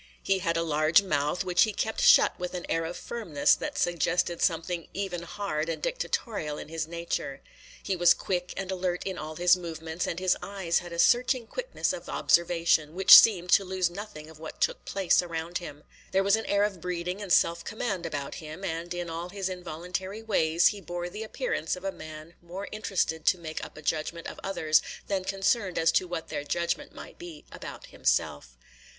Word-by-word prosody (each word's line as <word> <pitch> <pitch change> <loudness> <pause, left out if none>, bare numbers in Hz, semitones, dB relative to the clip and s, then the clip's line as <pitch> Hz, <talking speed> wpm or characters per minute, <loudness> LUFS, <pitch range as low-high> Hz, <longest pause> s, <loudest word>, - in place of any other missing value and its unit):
He 195 -1 +2
had 165 -2 0
a 165 - +1
large 155 +4 +4
mouth, 150 -1 0
which 180 -1 +2
he 220 - +5
kept - - -2
shut - - +6
with 180 0 -4
an 175 - -4
air 165 0 0
of 170 +2 -5
firmness 175 -12 +1
that 295 -1 -3
suggested 175 - 0
something 170 0 0
even 190 -3 -3
hard 170 -3 -3
and 165 - -2
dictatorial 250 - -2
in - - -8
his 160 -1 -3
nature. 170 -4 -4 0.4
He 195 - -1
was 175 -1 +5
quick 180 -1 -2
and 195 -1 -3
alert 180 -1 -2
in 190 -2 -3
all 155 +1 -6
his 175 +2 +5
movements, 165 -1 -5
and 170 - -3
his 185 -1 +2
eyes 190 -4 -1
had 175 -1 -10
a 170 - -6
searching 245 +6 +3
quickness - - -2
of - - -8
observation, 170 -2 +2
which 190 +1 +7
seemed 180 -5 +7
to 200 - +6
lose 185 -2 -1
nothing 200 -5 -8
of 160 -1 -14
what 160 - -9
took - - 0
place 195 -3 +2
around 170 0 -4
him. 150 -4 -9 0.3
There 190 +1 +3
was 200 +1 +4
an 225 - -4
air 200 0 +3
of 200 -5 -2
breeding 180 +2 -3
and 200 -3 -6
self 170 0 +3
command 205 -5 -3
about 145 -4 -4
him; 155 +4 -9
and 170 -1 -4
in 175 0 -3
all 165 +2 -5
his 195 0 -3
involuntary 180 +4 -5
ways 170 -6 +3
he 205 -1 -6
bore 175 0 -5
the 210 - -7
appearance 460 - -2
of 180 - -11
a 195 - -1
man 155 -1 -10
more 180 +4 -7
interested 185 -6 -1
to - - +5
make 160 -2 -6
up - - -9
a 155 - -10
judgment 160 +2 -2
of - - -7
others 160 -6 +2 0.2
than 190 -2 -2
concerned 195 0 0
as 165 0 +4
to 185 - +1
what 175 -2 -5
their 145 -2 -3
judgment 170 +3 -2
might - - -12
be 170 -4 -10
about - - -9
himself. 60 0 -1
175 Hz, 200 wpm, -28 LUFS, 165-195 Hz, 0.4 s, which